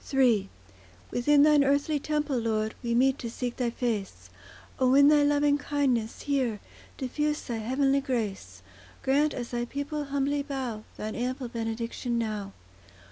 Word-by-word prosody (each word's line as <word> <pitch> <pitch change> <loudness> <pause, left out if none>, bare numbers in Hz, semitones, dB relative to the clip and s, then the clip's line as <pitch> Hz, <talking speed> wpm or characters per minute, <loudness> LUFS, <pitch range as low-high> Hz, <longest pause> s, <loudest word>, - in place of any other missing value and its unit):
III 240 -8 +3 0.6
Within 285 +4 +4
Thine 300 -1 +6
earthly 285 +2 +1
temple, 295 -3 -1
Lord, 220 -1 -1
We 235 -1 -1
meet 265 +2 +3
to 235 - -4
seek 245 +1 -4
Thy 245 -2 0
face; 230 -5 -3 0.5
O 255 0 +4
in 285 +1 +7
Thy 300 -1 +5
loving 290 0 +3
kindness, 270 -6 -1
hear, 260 -7 0 0.4
Diffuse 295 +3 -1
Thy 235 - -4
heavenly 270 +5 +1
grace; 200 - -4 0.4
Grant, 290 +3 +2
as 240 -1 -5
Thy 240 0 -1
people 285 +3 -4
humbly 280 +1 0
bow, 260 -6 -4
Thine 215 0 -4
ample 250 +1 -3
benediction 230 +1 -3
now. 215 -3 -3
255 Hz, 145 wpm, -28 LUFS, 230-285 Hz, 0.6 s, in